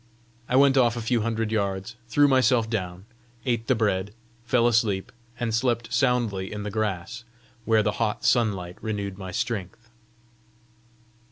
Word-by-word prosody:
I 125 - +1
went 135 0 +5
off 120 -1 +3
a - - -1
few 115 0 +1
hundred 115 -1 -1
yards, 100 +1 -2
threw 145 +6 +4
myself 130 -4 +3
down, 95 -4 -4 0.4
ate 115 -3 -1
the 130 - +3
bread, 105 -2 -1 0.3
fell 120 0 +2
asleep, 110 -5 +1 0.3
and 115 -2 -1
slept 120 0 0
soundly 120 -6 +1
in 105 -1 -5
the 105 - -4
grass, 110 +1 -3 0.4
where 110 -1 +3
the 105 - +1
hot 110 -2 -1
sunlight 95 -7 +1
renewed 100 -3 -4
my 95 -1 -6
strength. 110 +3 -4
110 Hz, 150 wpm, -25 LUFS, 100-120 Hz, 0.4 s, went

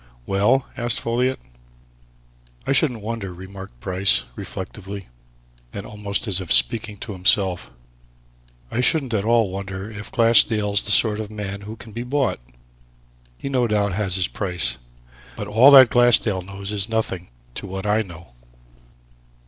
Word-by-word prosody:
"Well?" 105 +7 +2
asked 120 -3 +1
Folliot. 125 +3 -1 1.3
"I - - -1
shouldn't 130 -6 +1
wonder," 110 -3 -4
remarked 95 -6 -11
Bryce, 95 +6 +1
reflectively, 100 - -8 0.6
and 100 - -7
almost 105 +1 -4
as 95 -2 +2
if 90 - -6
speaking 110 -3 +3
to 105 - -8
himself, 95 -1 +2 1.0
"I 125 - 0
shouldn't 135 -2 0
at 105 -2 0
all 115 -4 +2
wonder 95 +2 -6
if 105 0 -9
Glassdale's 110 -3 +3
the 105 - -2
sort 105 0 +3
of 110 -2 -5
man 100 -2 -6
who 110 - -6
can 115 0 -13
be 115 +3 -6
bought. 135 +2 -1 1.0
He, - - -7
no 130 -3 +1
doubt, 100 -3 0
has 95 -2 -1
his 95 -2 +1
price. 85 - -3 0.6
But - - -5
all 115 +6 +6
that 130 -4 +9
Glassdale 120 -5 +4
knows 100 +2 -7
is 105 +1 -2
nothing 105 -5 -2 0.2
to 100 - -7
what 95 +1 -6
I 105 +1 +2
know." 85 -6 -11
105 Hz, 150 wpm, -22 LUFS, 95-115 Hz, 1.3 s, that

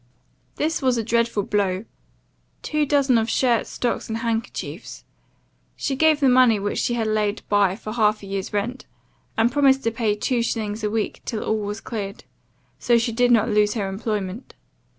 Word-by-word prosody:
"This 315 +1 -1
was 255 -2 +2
a 230 - 0
dreadful 230 -2 +1
blow; 195 0 -1 0.8
two 305 -1 0
dozen 270 -4 +3
of 225 +1 -1
shirts, 240 -1 +1
stocks 240 -2 -2
and 225 - -2
handkerchiefs. 230 0 -4 0.7
She 270 - -2
gave 315 +1 +4
the 275 - +3
money 250 -3 +5
which 205 +1 -2
she 240 - 0
had 230 -2 -1
laid 215 -1 0
by 200 -2 +3
for 215 0 -7
half 215 -2 +2
a - - -7
year's 195 -1 -4
rent, 225 +6 -3 0.5
and 225 +2 +3
promised 270 -1 +3
to 230 - +1
pay 225 -2 0
two 240 +3 0
shillings 220 -2 -2
a 210 - +1
week 220 0 -2
till 220 - -4
all 220 - 0
was 210 +1 -4
cleared; 205 -2 -6 0.6
so 240 -1 +3
she 230 +1 0
did 245 +2 +2
not 230 -3 +4
lose 210 +1 +2
her 205 -4 -1
employment. 205 +1 -4
225 Hz, 180 wpm, -23 LUFS, 210-245 Hz, 0.8 s, money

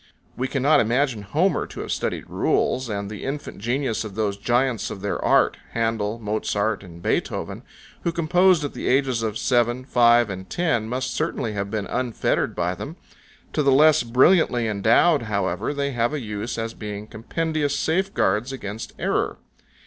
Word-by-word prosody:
We 130 - -1
cannot 140 +3 +3
imagine 120 0 +1
Homer 155 - 0
to - - -7
have - - -5
studied - - -2
rules, 130 -1 0
and 100 -1 -3
the 105 0 -7
infant 140 -4 -5
genius 120 +1 -1
of 105 -3 -8
those 105 -2 0
giants 120 +2 0
of 95 - -7
their 100 - -2
art, - - +3 0.2
Handel, 115 -1 -1
Mozart, 105 -1 -1
and 85 -2 -12
Beethoven, - - -2 0.4
who 170 - 0
composed 170 +1 +3
at 145 - -3
the - - -4
ages 130 -3 +2
of 110 -1 -2
seven, 120 0 +1
five, 120 -3 +4
and 95 0 -7
ten, 155 -11 0
must 130 +1 -2
certainly 115 -4 -2
have 100 -1 -3
been 105 -1 -2
unfettered 125 -3 -1
by - - 0
them: - - -7 0.6
to - - +1
the 140 -1 +3
less 150 +3 +6
brilliantly 125 0 +3
endowed, 110 - +3
however, 100 +3 -1
they 140 -1 -1
have 120 +2 0
a - - -2
use 105 -1 -4
as 115 0 -3
being 105 -1 -6
compendious 145 +6 -2
safeguards 140 - 0
against 110 -4 -6
error. - - -1
120 Hz, 165 wpm, -23 LUFS, 105-140 Hz, 0.6 s, less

